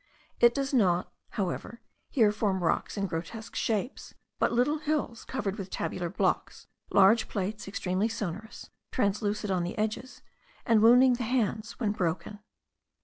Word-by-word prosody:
It 235 0 +6
does 275 0 -1
not, 185 -8 +2 0.2
however, 205 +4 -3 0.3
here 220 -6 +4
form 200 -3 -1
rocks 170 - 0
in 200 - 0
grotesque 180 +6 -6
shapes, 225 +3 -2 0.2
but - - +2
little 270 +6 +2
hills 295 -6 -2
covered 210 -7 -3
with 195 -1 -5
tabular 175 -2 -3
blocks, - - -1 0.2
large 200 +4 +5
plates 205 +1 -3
extremely 195 +1 -1
sonorous, 215 -1 -6 0.2
translucid 210 -1 0
on 185 -2 +1
the 175 - -4
edges, 220 +4 -3 0.4
and 225 -2 +4
wounding 250 +3 +7
the 245 0 -2
hands 225 -2 -1
when 220 -4 +1
broken. 190 +2 -2
215 Hz, 145 wpm, -29 LUFS, 195-235 Hz, 0.4 s, wounding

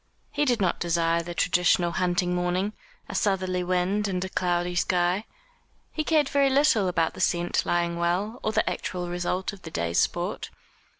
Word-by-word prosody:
He 295 - 0
did 245 -4 +1
not 185 -3 0
desire 170 -1 +1
the 170 +1 -7
traditional 175 0 +2
hunting 180 0 0
morning 180 +3 -1 0.3
a - - -7
southerly 185 -2 0
wind 185 +3 0
and 185 -1 -2
a - - -6
cloudy 175 -1 0
sky. 180 +3 +1 0.7
He 310 - -2
cared 305 -2 +2
very 280 0 +3
little 265 -7 +3
about 165 -2 0
the - - -7
scent 175 0 +1
lying 170 0 0
well, 190 +8 -1
or 215 - -1
the - - +1
actual 180 -1 -3
result 180 +2 -2
of 195 - -12
the 165 - -8
day's 85 - -1
sport. - - -1
180 Hz, 175 wpm, -26 LUFS, 175-205 Hz, 0.7 s, very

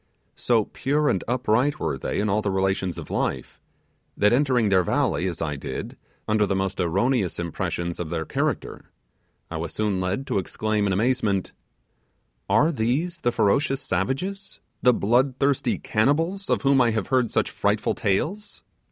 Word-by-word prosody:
So 115 -3 +2
pure 145 +2 0
and 95 - 0
upright 125 +3 +1
were - - -1
they - - -3
in 105 - +1
all 105 +1 +1
the 105 - -1
relations 95 -2 0
of - - -8
life, - - -3 0.6
that 105 +3 +4
entering 125 -5 +2
their 95 -2 +4
valley, 90 +1 0
as 85 -2 -3
I 75 -2 -2
did, 70 - -6 0.3
under 105 -1 +2
the 100 - 0
most 95 0 -2
erroneous 95 +3 +1
impressions 85 0 -3
of 85 -3 -4
their 80 -1 -2
character, - - -3 0.6
I 80 - -3
was 80 +1 -5
soon 105 -3 0
led 95 +9 -2
to 100 - 0
exclaim 105 +2 -1
in - - 0
amazement: 105 -2 0 1.0
'Are 155 +3 +4
these 150 +7 -1
the 120 - +1
ferocious 135 +6 +2
savages, 135 - -3 0.2
the 125 - +6
blood 125 +5 +2
thirsty 140 -1 +1
cannibals 165 - 0
of - - +1
whom 135 -1 +4
I 120 - +4
have 110 -3 -2
heard 125 -3 +2
such - - 0
frightful - - 0
tales! 195 - -2
110 Hz, 165 wpm, -24 LUFS, 95-135 Hz, 1.0 s, the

